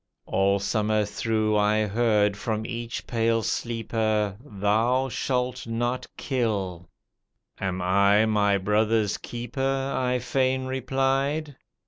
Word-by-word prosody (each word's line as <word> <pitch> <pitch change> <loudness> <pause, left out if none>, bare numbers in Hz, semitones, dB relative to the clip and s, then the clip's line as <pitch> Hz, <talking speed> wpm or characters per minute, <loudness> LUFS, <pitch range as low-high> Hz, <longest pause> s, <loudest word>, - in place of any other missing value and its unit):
All 100 +1 +2
summer 105 +1 +1
through 110 +1 0
I 105 +1 +2
heard 105 -1 +2
from 110 +1 -3
each 115 0 -5
pale 115 -1 +1
sleeper, 110 -3 -1
"Thou 115 +3 +1
shalt 125 0 -2
not 120 +2 -2
kill." 100 -9 -2 0.7
"Am 95 -1 -2
I 100 +3 +4
my 105 -2 +2
brother's 105 +2 +1
keeper?" 135 +3 -2
I 125 -1 +1
fain 130 +1 0
replied. 135 +3 -1
115 Hz, 105 wpm, -26 LUFS, 105-125 Hz, 0.7 s, I